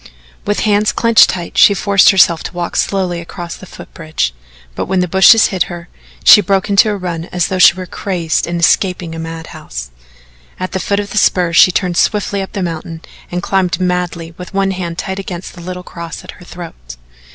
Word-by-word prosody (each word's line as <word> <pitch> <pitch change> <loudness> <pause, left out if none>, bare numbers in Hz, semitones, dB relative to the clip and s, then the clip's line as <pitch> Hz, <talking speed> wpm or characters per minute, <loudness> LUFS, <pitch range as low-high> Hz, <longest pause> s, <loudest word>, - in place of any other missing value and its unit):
With 205 - 0
hands 210 0 +2
clenched 230 -1 +4
tight 175 -2 -3
she 200 - +6
forced 200 0 +4
herself 175 -4 +4
to - - -6
walk 175 -1 -4
slowly 185 -3 -1
across 170 0 -8
the 185 - -13
foot - - -13
bridge, 155 - -3 0.4
but - - -4
when 190 0 0
the 180 - 0
bushes 190 +5 +6
hid 180 -2 +1
her, 175 0 -9 0.3
she 220 -1 +8
broke 195 +1 0
into 200 +2 +5
a 205 - -2
run 170 -3 -5
as 180 0 -2
though 185 -1 -2
she 180 - +7
were 185 0 -6
crazed 175 -2 -2
and 170 0 -3
escaping 175 0 +1
a 165 - -7
madhouse. 160 - -8 0.7
At 185 0 -4
the 190 - -2
foot 200 +2 -1
of 205 -1 -5
the 210 - +1
spur 175 -4 +2
she 185 - +6
turned 180 -1 -1
swiftly 205 -1 0
up 190 - -7
the 195 - -3
mountain 165 -1 -6 0.3
and 175 0 -4
climbed 190 -2 0
madly, 180 -2 -2
with 180 +2 -9
one 195 0 +1
hand 175 -3 -5
tight 190 0 -4
against 185 -2 -7
the 175 - -12
little 180 +1 -7
cross 170 -2 -9
at - - -9
her 180 - -16
throat. 160 - -10
180 Hz, 210 wpm, -15 LUFS, 170-195 Hz, 0.7 s, she